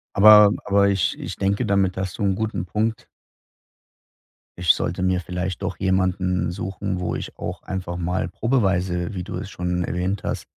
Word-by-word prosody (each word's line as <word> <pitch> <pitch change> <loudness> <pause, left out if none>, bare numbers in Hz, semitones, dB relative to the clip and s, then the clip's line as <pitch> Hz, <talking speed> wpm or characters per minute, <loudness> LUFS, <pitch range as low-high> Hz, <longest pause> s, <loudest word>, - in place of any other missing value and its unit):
Aber 105 0 +8
aber 100 0 +3
ich 100 -3 0
ich - - -5
denke, 100 +1 0
damit 95 -2 +1
hast 95 +1 -4
du - - -1
'n 95 -1 +2
guten 110 -4 -2
Punkt. 110 +4 -2 1.5
Ich 90 -1 -3
sollte - - -3
mir 95 -1 +2
vielleicht 90 0 -4
doch - - -3
jemanden 95 -2 +1
suchen, 95 +1 -4
wo 90 - -2
ich - - -7
auch - - -6
einfach 90 -2 -4
mal 90 0 -2
probeweise, 95 -5 0
wie 90 -2 -4
du 95 +1 -6
es 100 +2 -5
schon 90 -1 -2
erwähnt 90 +2 -2
hast, - - -3
95 Hz, 170 wpm, -23 LUFS, 90-100 Hz, 1.5 s, Aber